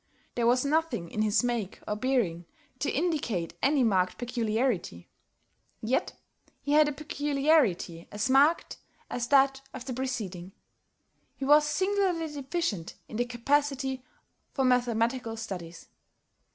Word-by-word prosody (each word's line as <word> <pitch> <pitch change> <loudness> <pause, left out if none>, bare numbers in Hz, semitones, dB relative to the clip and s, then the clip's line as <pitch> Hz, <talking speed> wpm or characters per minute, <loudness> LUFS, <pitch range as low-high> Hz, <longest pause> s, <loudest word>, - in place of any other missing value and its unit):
There 235 -1 +1
was 250 +3 +3
nothing 305 - 0
in 215 - -2
his 215 +2 +2
make 235 -6 -2
or 210 - -1
bearing 210 -9 0 0.3
to 280 - 0
indicate 275 - -1
any 280 -1 +3
marked 185 -5 +2
peculiarity. 230 - -1 0.7
Yet 230 +4 -1 0.5
he 285 - -2
had 300 0 +6
a - - -2
peculiarity 280 - +1
as 205 +2 -1
marked 280 +5 +3 0.3
as 240 -1 -2
that 270 0 +4
of 250 - -7
the 260 - -4
preceding. 210 -8 -4 0.8
He 270 - -4
was 295 +2 +6
singularly 360 -1 0
deficient 275 - -3
in 215 - -7
the 245 - +1
capacity 265 +1 0 0.5
for 270 - +1
mathematical 240 -1 +1
studies. 180 -6 -7
255 Hz, 125 wpm, -28 LUFS, 215-285 Hz, 0.8 s, had